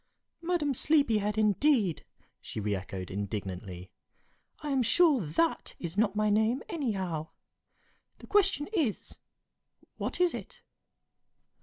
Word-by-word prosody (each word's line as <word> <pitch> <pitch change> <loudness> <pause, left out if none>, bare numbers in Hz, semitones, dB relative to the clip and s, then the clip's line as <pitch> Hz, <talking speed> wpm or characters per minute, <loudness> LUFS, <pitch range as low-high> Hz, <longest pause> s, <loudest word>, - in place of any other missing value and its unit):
"Madam 335 -5 0
Sleepyhead, 230 -8 +2
indeed!" 215 - +2 0.4
she - - -6
re 105 0 -1
echoed, 95 -1 -5
indignantly. 95 -2 -5 0.7
"I 295 - -2
am 270 -2 +2
sure 295 +1 +4
that 170 - 0
is 170 0 -5
not 210 -1 +2
my 215 0 +2
name, 220 +5 +2
anyhow. 190 - -2 0.9
The - - -13
question 390 -8 +2
is, 295 - -1 0.8
What - - -3
is 360 -1 +3
it?" - - -9
215 Hz, 115 wpm, -30 LUFS, -, 0.9 s, sure